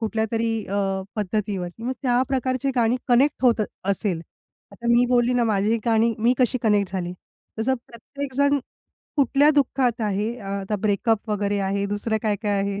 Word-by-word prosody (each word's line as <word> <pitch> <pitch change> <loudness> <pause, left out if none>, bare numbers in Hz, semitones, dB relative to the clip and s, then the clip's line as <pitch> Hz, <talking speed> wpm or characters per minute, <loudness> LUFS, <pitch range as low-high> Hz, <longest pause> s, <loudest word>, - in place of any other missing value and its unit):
कुठल्यातरी 225 +1 -1 0.2
अ, 200 - -3 0.4
पद्धतीवरती, 200 -1 -3
मग 255 +2 -1
त्या 250 -1 +3
प्रकारची 260 0 0
गाणी 235 +1 +3
कनेक्ट 260 +3 +3
होत 235 -3 +4 0.2
असेल. 195 -3 0 0.5
आता 215 +4 -8
मी 240 +1 +5
बोलली 245 0 +3
ना 245 -1 +2
माझी 215 +1 +2
गाणी 230 0 +3
मी 235 +3 +3
कशी 255 0 +2
कनेक्ट 205 -3 +2
झाली. 180 -2 -3 0.5
तसं 260 +4 +1
प्रत्येकजण 280 +4 -1 0.6
कुठल्या 280 +1 +4
दुःखात 265 -5 +1
आहे, 210 +2 -1
आ 200 -4 -8
आता 205 +2 -2
ब्रेकअप 215 +2 0
वगैरे 205 -1 0
आहे, 195 +1 -1
दुसरं 205 +2 -1
काय-काय 205 -1 0
आहे. 200 0 -2
225 Hz, 155 wpm, -23 LUFS, 205-245 Hz, 0.6 s, मी